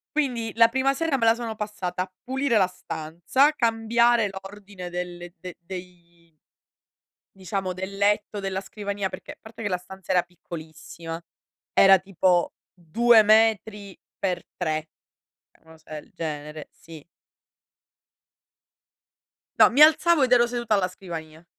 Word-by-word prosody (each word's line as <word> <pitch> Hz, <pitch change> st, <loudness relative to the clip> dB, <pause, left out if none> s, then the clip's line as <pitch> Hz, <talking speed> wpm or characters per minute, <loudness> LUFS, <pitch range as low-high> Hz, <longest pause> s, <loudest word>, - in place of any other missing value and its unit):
Quindi, 245 Hz, -7 st, -1 dB
la 230 Hz, 0 st, +6 dB
prima 265 Hz, +2 st, +1 dB
sera 325 Hz, -2 st, 0 dB
me 230 Hz, -, 0 dB
la 225 Hz, 0 st, +5 dB
sono 230 Hz, -2 st, -5 dB
passata 205 Hz, -4 st, -4 dB
a 185 Hz, -, -12 dB
pulire 265 Hz, -2 st, 0 dB
la 190 Hz, -, +4 dB
stanza, 175 Hz, -, 0 dB
cambiare 235 Hz, -2 st, +2 dB
l'ordine 195 Hz, -1 st, -9 dB
delle 175 Hz, 0 st, -6 dB
de 180 Hz, 0 st, -9 dB
dei 170 Hz, -2 st, -12 dB, 1.0 s
diciamo 190 Hz, 0 st, -4 dB
del 190 Hz, +2 st, -6 dB
letto, 205 Hz, +1 st, +1 dB
della 195 Hz, -1 st, -3 dB
scrivania, 200 Hz, -1 st, -4 dB
perché, -, -, -10 dB
parte 225 Hz, +1 st, -12 dB
che 205 Hz, -, -2 dB
la 180 Hz, -, 0 dB
stanza 190 Hz, +1 st, -9 dB
era 180 Hz, -1 st, +3 dB
piccolissima, 165 Hz, -1 st, -9 dB, 0.5 s
era 195 Hz, -1 st, +7 dB
tipo 185 Hz, -2 st, +1 dB, 0.2 s
2 220 Hz, +7 st, +4 dB
metri 215 Hz, -2 st, +2 dB, 0.2 s
per 180 Hz, -3 st, -2 dB
3, 155 Hz, 0 st, -2 dB, 0.7 s
una 160 Hz, 0 st, -18 dB
cosa 155 Hz, -1 st, -10 dB
del -, -, -22 dB
genere, 150 Hz, -1 st, -6 dB
sì. 160 Hz, -3 st, -14 dB, 2.6 s
No, -, -, +8 dB
mi 275 Hz, -, +2 dB
alzavo 315 Hz, 0 st, +6 dB
ed 250 Hz, -, 0 dB
ero 240 Hz, -1 st, +5 dB
seduta 240 Hz, -2 st, -1 dB
alla 190 Hz, -2 st, +1 dB
scrivania. 165 Hz, -3 st, -9 dB
195 Hz, 135 wpm, -24 LUFS, 175-225 Hz, 2.6 s, No